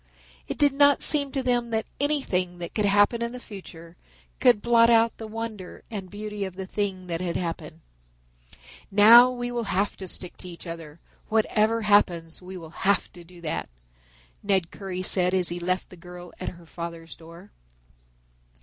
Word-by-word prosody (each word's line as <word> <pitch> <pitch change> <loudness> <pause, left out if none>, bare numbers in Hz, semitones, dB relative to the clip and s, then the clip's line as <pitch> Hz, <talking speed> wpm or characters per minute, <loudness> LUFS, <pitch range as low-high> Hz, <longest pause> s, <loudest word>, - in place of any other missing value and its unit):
It - - -4
did 285 -2 +4
not 285 0 +4
seem 285 -2 +3
to 270 -1 -2
them 245 -2 +1
that 220 -1 -1
anything 195 -12 -1
that 175 -1 -7
could 210 - 0
happen 205 +4 +3
in 235 +1 -2
the 250 - -7
future 175 -7 -11 0.4
could 245 -5 +5
blot 230 +1 +4
out 230 0 +4
the 220 - -7
wonder 215 -4 -7
and 195 -4 -6
beauty 210 0 -5
of 190 -2 -6
the 190 0 -5
thing 190 -1 -3
that 170 -1 -4
had 175 -2 -2
happened. 165 -2 -5 1.1
"Now 225 +5 +8
we 245 -1 -4
will 240 -1 -2
have 200 +1 0
to 190 - -7
stick 180 0 -6
to 180 - -7
each 170 +1 -11
other, 165 -2 -8 0.3
whatever 220 +1 +2
happens 175 -6 +2
we 185 +1 -9
will 165 -3 -10
have 200 +1 +1
to 175 - -12
do 175 0 -16
that," 155 - -3 0.7
Ned 190 -4 0
Currie 185 -2 -5
said 180 0 +3
as 180 -2 +1
he 175 +1 -4
left 185 +1 -2
the - - -10
girl 175 0 -11
at 185 - -3
her 175 -1 -14
father's 165 0 -8
door. 170 +4 -14
195 Hz, 180 wpm, -25 LUFS, 175-225 Hz, 1.1 s, Now